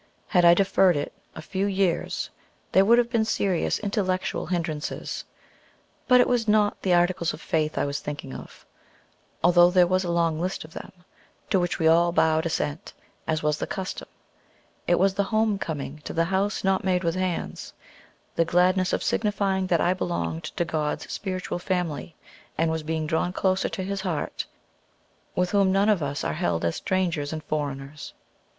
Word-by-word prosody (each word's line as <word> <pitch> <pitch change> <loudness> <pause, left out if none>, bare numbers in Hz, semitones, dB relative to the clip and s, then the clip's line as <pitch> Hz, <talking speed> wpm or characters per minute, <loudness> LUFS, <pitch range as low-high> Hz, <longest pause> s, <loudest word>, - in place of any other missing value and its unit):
Had 180 -3 +4
I 170 0 +8
deferred 190 -3 +3
it 145 - -3 0.2
a 160 - -8
few 190 +3 -1
years 190 -3 -1 0.4
there 190 - +6
would 230 +4 +5
have 240 -1 +2
been 230 -3 +2
serious 195 -5 0
intellectual 195 -3 -1
hindrances. 160 -4 -3 0.8
But 250 -1 +6
it 245 - +5
was 240 -2 +1
not 210 -1 +2
the 185 - 0
Articles 175 -1 +1
of - - -14
Faith 155 -1 -1
I - - +1
was 140 0 -2
thinking 145 -2 -6
of, - - -11 0.8
although 175 0 +6
there 180 0 +5
was 185 +2 +1
a 175 - -3
long 165 -2 +1
list 185 +2 -2
of 160 - -15
them, - - -8 0.6
to 190 - +4
which 175 -1 -1
we 160 - +2
all 170 +1 +5
bowed 160 0 +2
assent, 160 -1 -3 0.3
as 155 -1 0
was 150 0 +1
the - - -3
custom. 190 -2 -5 0.8
It 175 - +4
was 195 +1 +3
the 200 0 0
homecoming 195 -9 -1
to - - -5
the 165 0 +2
"house 195 +3 0
not 190 -1 +2
made 185 -1 +1
with 165 -1 +1
hands," 185 -1 -3 0.6
the 165 - +3
gladness 180 +2 +2
of - - 0
signifying 195 -3 0
that 170 -3 +2
I 175 - +3
belonged 85 - -3
to 175 - -2
God's 155 -2 -2
spiritual 185 -2 -3
family, 175 -4 -3 0.4
and 160 0 +2
was 160 0 -2
being 160 0 -2
drawn 165 +3 0
closer 190 0 +1
to 190 - -4
his 195 +1 -3
heart, 175 -6 -3 0.9
with 180 0 +1
whom 200 -2 +3
none 195 +2 +3
of 205 -5 +3
us 145 0 -3
are - - -1
held 155 - -1
as 85 - 0
"strangers 175 -6 -1
and 155 -1 -5
foreigners." 145 -1 -5
175 Hz, 180 wpm, -25 LUFS, 160-190 Hz, 0.9 s, I